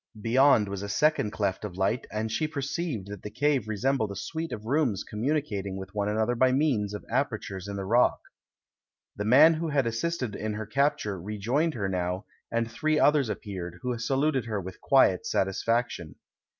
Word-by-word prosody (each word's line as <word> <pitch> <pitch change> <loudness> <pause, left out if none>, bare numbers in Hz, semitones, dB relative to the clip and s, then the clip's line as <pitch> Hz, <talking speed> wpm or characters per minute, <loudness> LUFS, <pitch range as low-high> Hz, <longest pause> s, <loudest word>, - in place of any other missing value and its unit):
Beyond 115 0 +4
was 100 -1 -4
a 100 - -5
second 150 0 +2
cleft 100 -3 -2
of 95 -4 -6
light, 100 +5 0
and 110 +1 -2
she 155 +8 0
perceived 140 - -3
that 105 -2 -7
the 105 - -6
cave 135 +1 +1
resem 125 +6 0
bled 110 -2 0
a 100 - -6
suite 160 - -4
of 110 - -6
rooms 130 - +1
communicating 105 -5 -2
with 95 0 -8
one 105 -1 -1
another 110 +3 +1
by 130 +2 +3
means 125 -8 +1
of 105 - -8
apertures 110 -7 -2
in 100 - -5
the 100 -1 -4
rock. 120 +5 +3 1.0
The 105 - -3
man 145 +9 +7
who 165 +1 -2
had 140 -4 +1
assisted 120 0 -2
in 110 0 -3
her 110 +1 -4
capture 110 - 0
rejoined 115 - -1
her 100 -4 -1
now, 90 +1 -2 0.3
and 115 0 0
three 155 +7 0
others 145 -5 +4
appeared, 90 -5 -5
who 125 -1 -1
saluted 135 +2 +1
her 110 -3 -2
with 95 -1 -8
quiet 130 -9 +4
satisfaction. 95 -4 -1
110 Hz, 185 wpm, -27 LUFS, 100-140 Hz, 1.0 s, man